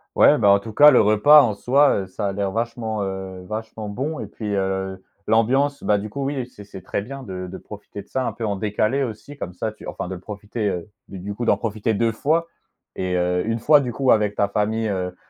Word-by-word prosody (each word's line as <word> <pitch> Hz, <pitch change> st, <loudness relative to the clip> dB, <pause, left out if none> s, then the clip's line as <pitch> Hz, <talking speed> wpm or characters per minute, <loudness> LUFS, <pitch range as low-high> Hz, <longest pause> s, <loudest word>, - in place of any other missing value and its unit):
Ouais, 150 Hz, -, +6 dB
bah 105 Hz, -5 st, +4 dB
en 100 Hz, -, +5 dB
tout 110 Hz, +2 st, -9 dB
cas, 150 Hz, +6 st, +8 dB
le 125 Hz, -, +6 dB
repas 110 Hz, +9 st, +7 dB
en 110 Hz, -6 st, +1 dB
soi, 140 Hz, +7 st, +3 dB
heu, -, -, -6 dB
ça 100 Hz, +2 st, -4 dB
a 100 Hz, -, -2 dB
l'air 100 Hz, 0 st, -2 dB
vachement, 115 Hz, -1 st, -3 dB
heu, 95 Hz, -1 st, -5 dB
vachement 110 Hz, 0 st, -5 dB
bon 140 Hz, +9 st, -3 dB
et -, -, -5 dB
puis, 110 Hz, -, -9 dB
heu, 95 Hz, -1 st, -2 dB, 0.2 s
l'ambiance, 130 Hz, +6 st, +2 dB
bah, 105 Hz, -, +3 dB
du 100 Hz, +1 st, -4 dB
coup, 140 Hz, +5 st, -4 dB
oui 135 Hz, -2 st, -2 dB
c'est 110 Hz, -4 st, -14 dB
c'est 95 Hz, -2 st, -11 dB
très -, -, -2 dB
bien 135 Hz, +6 st, -8 dB
de 95 Hz, -4 st, -6 dB
de -, -, -7 dB
profiter 105 Hz, -1 st, -10 dB
de -, -, -29 dB
ça 130 Hz, -, -2 dB
un -, -, -1 dB
peu 115 Hz, -, -5 dB
en 100 Hz, -2 st, -1 dB
décalé 105 Hz, +6 st, 0 dB
aussi, 120 Hz, +3 st, -5 dB
comme 90 Hz, -9 st, -6 dB
ça 110 Hz, +4 st, -3 dB
tu 110 Hz, -, -12 dB
enfin -, -, -5 dB
de 95 Hz, -, -5 dB
le 90 Hz, -, -7 dB
profiter, 105 Hz, +2 st, -4 dB
heu, 90 Hz, -1 st, -4 dB, 0.2 s
du 95 Hz, -, -9 dB
du 100 Hz, +3 st, -5 dB
coup, 120 Hz, +4 st, -4 dB
d'en -, -, +3 dB
profiter 110 Hz, 0 st, -2 dB
2 115 Hz, +2 st, +1 dB
fois 160 Hz, +9 st, 0 dB, 0.5 s
et 90 Hz, -1 st, -2 dB
heu, 90 Hz, 0 st, +1 dB
1 115 Hz, 0 st, 0 dB
fois, 145 Hz, +6 st, +5 dB
du 125 Hz, -4 st, -3 dB
coup, 130 Hz, +2 st, +2 dB
avec 105 Hz, -1 st, +2 dB
ta 100 Hz, -, +2 dB
famille, 110 Hz, +2 st, -1 dB
heu, 90 Hz, -3 st, -3 dB
105 Hz, 250 wpm, -22 LUFS, 100-120 Hz, 0.5 s, cas